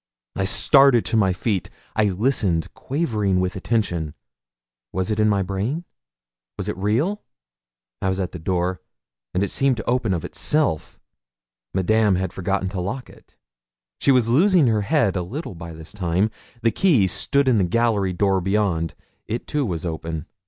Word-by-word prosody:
I 95 Hz, -, 0 dB
started 135 Hz, +3 st, +5 dB
to 115 Hz, -, -1 dB
my 100 Hz, -4 st, +4 dB
feet; 95 Hz, 0 st, -1 dB, 0.3 s
I 110 Hz, -, +3 dB
listened, 100 Hz, -, 0 dB
quivering 110 Hz, -, -1 dB
with 90 Hz, 0 st, -1 dB
attention. 90 Hz, -7 st, -1 dB, 0.8 s
Was 95 Hz, +3 st, -1 dB
it 105 Hz, -, -1 dB
in 105 Hz, 0 st, +4 dB
my 100 Hz, -2 st, +2 dB
brain? 105 Hz, -, -3 dB, 0.7 s
was -, -, -4 dB
it -, -, -2 dB
real? 115 Hz, -, 0 dB, 0.8 s
I 95 Hz, -, +1 dB
was 95 Hz, +1 st, -1 dB
at 95 Hz, -2 st, -2 dB
the 90 Hz, -, -7 dB
door, 90 Hz, +2 st, -1 dB, 0.5 s
and 90 Hz, +7 st, 0 dB
it 100 Hz, -, -2 dB
seemed 135 Hz, -3 st, +2 dB
to 110 Hz, -, -5 dB
open 120 Hz, -3 st, +1 dB
of 85 Hz, -, -4 dB
itself. 150 Hz, -, -1 dB, 0.7 s
Madame 105 Hz, +2 st, +2 dB
had 95 Hz, -1 st, -2 dB
forgotten 95 Hz, +1 st, -1 dB
to 95 Hz, -2 st, -4 dB
lock 125 Hz, +8 st, -5 dB
it; -, -, -21 dB, 0.6 s
she -, -, +1 dB
was 125 Hz, -4 st, +4 dB
losing 170 Hz, -, +4 dB
her 110 Hz, -3 st, +2 dB
head 130 Hz, -, +1 dB
a 90 Hz, -, 0 dB
little 120 Hz, -, -5 dB
by 85 Hz, -1 st, -8 dB
this 80 Hz, -1 st, -11 dB
time. 95 Hz, +2 st, 0 dB, 0.3 s
The 115 Hz, -, +4 dB
key 155 Hz, -, +3 dB
stood 140 Hz, -, +1 dB
in 120 Hz, -5 st, +4 dB
the -, -, +3 dB
gallery 105 Hz, 0 st, +1 dB
door 95 Hz, +1 st, +1 dB
beyond; 95 Hz, -4 st, 0 dB, 0.3 s
it 115 Hz, +3 st, -3 dB
too, 145 Hz, -4 st, -1 dB
was 85 Hz, -3 st, -3 dB
open. 80 Hz, -1 st, -4 dB
100 Hz, 170 wpm, -22 LUFS, 90-120 Hz, 0.8 s, started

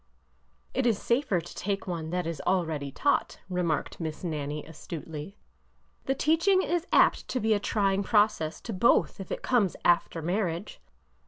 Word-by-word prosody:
It -, -, +1 dB
is 225 Hz, -4 st, +2 dB
safer 235 Hz, -6 st, +1 dB
to 170 Hz, -, -10 dB
take 200 Hz, 0 st, -2 dB
one 165 Hz, -4 st, -4 dB
that 180 Hz, 0 st, -1 dB
is 165 Hz, -3 st, -4 dB
already 160 Hz, -7 st, 0 dB
taught," 285 Hz, -, 0 dB
re 180 Hz, 0 st, 0 dB
marked 160 Hz, -4 st, -1 dB
Miss 160 Hz, 0 st, -5 dB
Nannie, 150 Hz, -3 st, -3 dB
astutely. 160 Hz, +2 st, -8 dB, 0.7 s
The 270 Hz, -, +1 dB
teaching 330 Hz, +7 st, +3 dB
is 350 Hz, +1 st, -1 dB
apt -, -, +4 dB
to 255 Hz, -, -1 dB
be 220 Hz, -1 st, +2 dB
a 205 Hz, -, +2 dB
trying 200 Hz, -2 st, +1 dB
process 205 Hz, -6 st, +2 dB
to 230 Hz, -, -5 dB
both 215 Hz, +2 st, +3 dB
if 195 Hz, -, -7 dB
it -, -, -4 dB
comes 220 Hz, -8 st, +2 dB
after 170 Hz, -1 st, +2 dB
marriage. 180 Hz, +1 st, -2 dB
185 Hz, 165 wpm, -28 LUFS, 160-220 Hz, 0.7 s, apt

